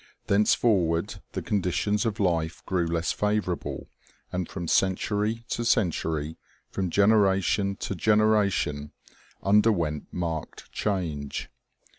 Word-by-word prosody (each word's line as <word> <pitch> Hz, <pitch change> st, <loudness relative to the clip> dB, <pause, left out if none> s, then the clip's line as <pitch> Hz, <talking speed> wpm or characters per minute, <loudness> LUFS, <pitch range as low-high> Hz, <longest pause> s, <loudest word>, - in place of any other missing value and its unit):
Thenceforward 100 Hz, -5 st, +2 dB
the -, -, -3 dB
conditions 105 Hz, +3 st, 0 dB
of 110 Hz, 0 st, -3 dB
life 85 Hz, -4 st, 0 dB
grew 90 Hz, -2 st, 0 dB
less 85 Hz, 0 st, 0 dB
favorable, 105 Hz, -4 st, -2 dB, 0.4 s
and 90 Hz, -1 st, -3 dB
from 85 Hz, -3 st, -5 dB
century 105 Hz, +5 st, +1 dB
to 120 Hz, -, -2 dB
century, 80 Hz, -8 st, 0 dB, 0.3 s
from 95 Hz, -2 st, -2 dB
generation 100 Hz, -1 st, +3 dB
to 95 Hz, -, -4 dB
genera 105 Hz, +2 st, +3 dB
tion, 75 Hz, -5 st, -3 dB, 0.5 s
underwent 100 Hz, -7 st, +2 dB
marked 80 Hz, -3 st, -5 dB
change. 80 Hz, -9 st, -3 dB
95 Hz, 105 wpm, -26 LUFS, 85-105 Hz, 0.5 s, generation